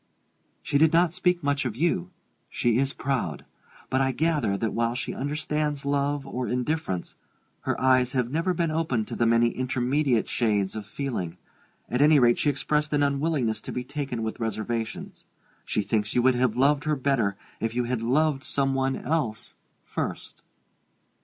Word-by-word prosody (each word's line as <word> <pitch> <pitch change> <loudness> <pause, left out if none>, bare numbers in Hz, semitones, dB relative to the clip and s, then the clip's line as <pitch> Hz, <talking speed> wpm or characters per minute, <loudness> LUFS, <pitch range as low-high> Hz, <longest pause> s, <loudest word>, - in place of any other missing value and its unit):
"She 140 - +1
did 160 +1 +5
not 170 0 +4
speak 180 -1 +1
much 145 0 +1
of 120 -5 -3
you: 125 - 0 0.4
she 120 0 +1
is 135 0 +1
proud. 135 -2 -2 0.5
But 130 - +2
I 135 0 +2
gather 150 -9 +1
that 110 +1 -1
while 115 0 0
she - - -3
understands 150 0 -2
love 140 0 0
or 125 -2 -3
indifference, 125 - -2 0.5
her - - -1
eyes 130 -1 +3
have 125 -2 0
never 165 +5 +1
been 165 -1 0
opened 155 -9 0
to - - -4
the 115 - +2
many 115 +1 +4
intermediate 130 0 0
shades 105 -4 0
of 105 -2 -6
feeling. 95 -12 -4 0.5
At 125 +3 0
any 150 +1 +6
rate, 120 -3 +4
she 150 - +2
expressed 150 +2 0
an 145 -1 +3
unwillingness 140 -5 0
to - - -7
be 125 - -3
taken 135 -4 -4
with 110 +2 -4
reservations 115 0 -4 0.4
she 105 - 0
thinks 105 0 -1
you 120 - +3
would 130 0 +5
have 125 -2 +1
loved 145 +3 +3
her 155 0 +2
better 130 -7 +1 0.2
if 115 +1 -2
you 125 - +1
had 120 -1 -2
loved 140 +4 +1
some 135 -3 0
one 135 0 +1
else 145 -9 -2 0.3
first. - - -5
130 Hz, 170 wpm, -26 LUFS, 115-145 Hz, 0.5 s, any